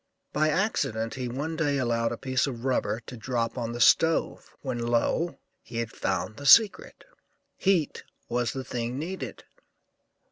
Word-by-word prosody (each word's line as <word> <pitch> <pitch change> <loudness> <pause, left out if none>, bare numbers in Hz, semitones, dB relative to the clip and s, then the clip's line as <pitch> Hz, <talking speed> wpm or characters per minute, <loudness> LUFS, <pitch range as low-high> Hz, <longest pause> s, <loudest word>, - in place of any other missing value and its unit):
By 155 +1 +2
accident 140 - 0
he 130 -2 -4
one 145 +7 -3
day 145 -3 +1
allowed 115 -3 0
a 120 - -4
piece 130 +2 0
of 125 -2 -6
rubber 120 -4 0
to 120 +3 -10
drop 115 0 -2
on 115 -2 -3
the 120 - -5
stove, 160 +7 +3
when, 130 -3 -3
lo! 120 +8 0 0.2
he 115 - -8
had 115 -1 -2
found 110 - -2
the 145 - -4
secret, 215 +6 +5 0.5
heat 185 -6 +1 0.3
was 120 -2 0
the 135 - -4
thing 120 0 -3
needed. 180 +6 -5
130 Hz, 155 wpm, -27 LUFS, 115-150 Hz, 0.5 s, secret